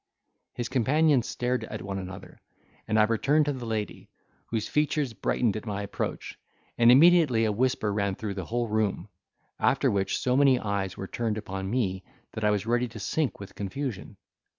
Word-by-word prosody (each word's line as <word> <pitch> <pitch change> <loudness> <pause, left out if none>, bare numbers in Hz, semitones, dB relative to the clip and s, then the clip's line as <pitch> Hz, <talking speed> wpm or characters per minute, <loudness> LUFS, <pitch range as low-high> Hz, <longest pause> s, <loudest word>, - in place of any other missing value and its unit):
His 120 - -3
companions 135 +1 +2
stared 125 +1 -1
at - - -7
one 100 -1 -4
another, 95 +1 -9 0.5
and 110 0 +1
I - - +7
returned 135 +8 +2
to 145 - 0
the 125 -3 -6
lady, 110 -2 -4 0.4
whose 110 -2 -2
features 150 -4 0
brightened 110 -1 0
at 110 +1 -6
my 100 -1 -3
approach, 100 - -5 0.4
and 120 0 +6
immediately 145 -5 +6
a 110 - +1
whisper 110 -2 0
ran 100 -2 0
through 105 -1 -4
the 95 -3 -5
whole 120 +3 -1
room; 110 -2 -1 0.5
after 135 +1 +2
which 100 -1 0
so 125 0 0
many 135 -2 +5
eyes 100 -2 -2
were 95 - -5
turned 110 +1 -2
upon 95 -2 -5
me 95 -5 -1 0.3
that 110 - -6
I 105 - +4
was 105 -1 0
ready 120 +2 +1
to 110 -1 -10
sink 130 - -1
with 100 - -10
confusion. 125 +2 -5
110 Hz, 180 wpm, -27 LUFS, 100-130 Hz, 0.5 s, I